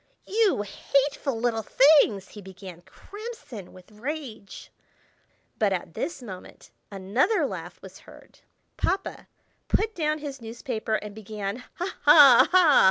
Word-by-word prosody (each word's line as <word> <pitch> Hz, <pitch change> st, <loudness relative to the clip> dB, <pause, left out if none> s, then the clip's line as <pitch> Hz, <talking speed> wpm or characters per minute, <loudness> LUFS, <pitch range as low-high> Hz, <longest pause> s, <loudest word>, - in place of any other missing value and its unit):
"You 415 Hz, -, +1 dB
hateful 275 Hz, +4 st, -1 dB
little 230 Hz, -1 st, 0 dB
things!" 245 Hz, -6 st, +4 dB
he 210 Hz, -, -11 dB
began, 190 Hz, -2 st, -11 dB
crimson 395 Hz, -, -10 dB
with 185 Hz, +2 st, -17 dB
rage. 235 Hz, -3 st, -7 dB, 0.9 s
But 205 Hz, -3 st, +2 dB
at 175 Hz, -2 st, -5 dB
this 325 Hz, -, -5 dB
moment 190 Hz, -5 st, -11 dB, 0.2 s
another 205 Hz, -, 0 dB
laugh -, -, -7 dB
was -, -, -12 dB
heard. -, -, -17 dB, 0.4 s
Papa 385 Hz, -, -2 dB, 0.4 s
put 440 Hz, +1 st, 0 dB
down 305 Hz, -4 st, -1 dB
his 285 Hz, -3 st, -8 dB
newspaper 225 Hz, -1 st, -4 dB
and 210 Hz, -1 st, -5 dB
began, 210 Hz, 0 st, -6 dB, 0.2 s
"Ha! 360 Hz, +2 st, -5 dB
ha! 290 Hz, -5 st, +8 dB
ha! 350 Hz, -6 st, +6 dB
235 Hz, 125 wpm, -25 LUFS, 200-305 Hz, 0.9 s, ha